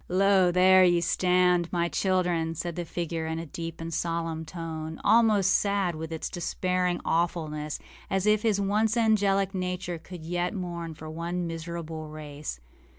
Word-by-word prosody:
âLo, 190 -1 +4
there 185 +1 +6
ye 175 -1 +4
stand, 180 0 +2
my 170 -1 +1
children,â 175 -3 0
said 170 0 -3
the 175 - -3
figure, 165 -1 -3
in 160 0 -2
a 165 - -4
deep 165 +2 -6
and 165 0 -5
solemn 165 -1 -2
tone, 160 -1 -6
almost 215 -4 +4
sad 200 -3 +1
with 160 +1 -6
its 160 - -3
despairing 180 0 -1
awfulness, 155 -3 -1 0.3
as 195 0 0
if 210 0 +4
his 215 -3 +2
once 210 +3 +1
angelic 200 -3 +2
nature 180 -2 -3
could 170 0 -10
yet 175 +2 -1
mourn 170 -3 -5
for 155 - -11
our 170 +2 -5
miserable 165 -2 -4
race. 150 - -7
175 Hz, 155 wpm, -27 LUFS, 165-185 Hz, 0.3 s, there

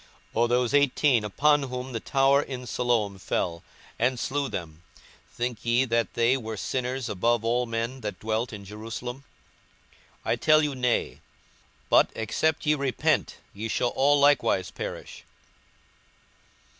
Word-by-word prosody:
42:013:004 115 - +1
Or 120 - +4
those 125 +1 +1
eighteen, 140 -3 +3
upon 145 +8 +3
whom 125 +1 -5
the 115 - -2
tower 135 +3 +3
in 125 -3 -6
Siloam 115 -5 0
fell, 85 -2 -2 0.4
and 125 +1 +1
slew 140 +2 -1
them, 80 -2 -6 0.5
think 120 -1 -4
ye 120 +2 +2
that 115 -1 -1
they 120 +2 +3
were 110 -4 -5
sinners 130 +3 -2
above 115 +4 0
all 120 +1 +1
men 115 +3 -3
that 105 -2 -5
dwelt 110 +2 -2
in 100 -2 -8
Jerusalem? 115 +5 -7 1.0
42:013:005 - - 0
I - - +3
tell 155 0 +4
you, 145 -1 0
Nay: 125 -2 -1 0.7
but, - - +6
except 155 +9 0
ye 150 - +4
repent, 140 -4 0 0.2
ye 105 +3 -5
shall 120 +2 0
all 145 +3 +3
likewise 140 -9 +3
perish. - - -7
120 Hz, 145 wpm, -26 LUFS, 110-135 Hz, 1.0 s, but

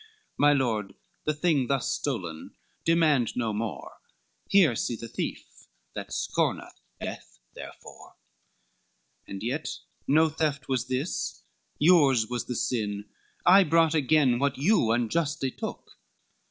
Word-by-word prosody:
My 145 0 +4
Lord, 115 -8 0 0.3
the 155 - +1
thing 150 -5 +1
thus 135 -1 0
stolen 90 - -4 0.3
demand 155 -8 +2
no 115 -3 -1
more, 110 0 -5 0.5
Here 180 -11 +5
see 120 - -2
the 115 - -8
thief - - -6 0.3
that - - -7
scorneth - - -1 0.3
death - - -7 0.2
therefor. - - -12 1.1
XXV - - -13
"And 100 +1 -6
yet 135 +7 -2 0.4
no 160 +3 +4
theft 150 -3 -2
was 130 -2 -1
this, 130 - -3 0.3
yours 145 -8 +5
was 120 +1 -4
the 125 - -4
sin, 105 -4 -2 0.3
I 195 +2 +8
brought 165 -1 +3
again 140 -4 +3
what 140 0 0
you 150 - +3
unjustly 135 +4 0
took." - - -7
135 Hz, 125 wpm, -27 LUFS, 115-155 Hz, 1.1 s, I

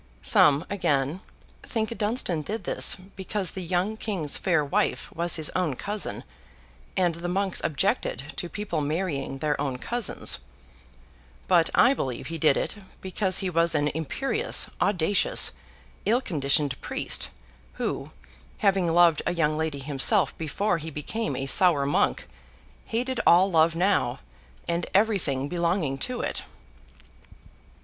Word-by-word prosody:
Some, 145 +1 +5
again, 155 -4 -1 0.4
think 225 -1 -3
Dunstan 210 -7 -1
did 215 +9 -5
this - - +2 0.2
because 190 -1 -2
the 190 - -6
young 185 +5 -1
King's 185 -10 0
fair 170 -6 +1
wife 140 - -1
was 170 +1 +1
his 155 -2 0
own 175 -7 -1
cousin, 205 +7 -4 0.7
and 175 -2 +2
the 170 +2 -6
monks 190 +1 0
objected 145 -1 -1
to 175 - -3
people 195 -6 -3
marrying 150 -3 -2
their 145 0 -1
own 135 -3 -2
cousins; 235 - -1 1.1
but 170 -3 +4
I 250 - +6
believe 130 - -4
he 165 - -4
did 150 -2 +4
it, - - -3 0.2
because 190 0 0
he - - 0
was 165 0 +2
an 145 0 +2
imperious, 270 - 0
audacious, 200 0 +3 0.5
ill 235 +4 +2
conditioned 145 - +1
priest, - - -2 0.4
who, - - -3 0.5
having 190 -4 +2
loved 170 -2 +4
a - - 0
young 155 -2 +1
lady 160 -2 -2
himself 140 - +2
before 175 +4 -1
he 160 +1 -6
became 190 +10 -4
a 135 - -3
sour 160 -1 +5
monk, 140 - 0 0.6
hated 250 +2 -2
all 185 +3 +6
love 165 0 +3
now, 170 -8 +1 0.5
and 170 0 -1
everything 190 -11 +1
belonging 170 -4 -1
to 250 - -1
it. - - -2
170 Hz, 135 wpm, -26 LUFS, 150-195 Hz, 1.1 s, I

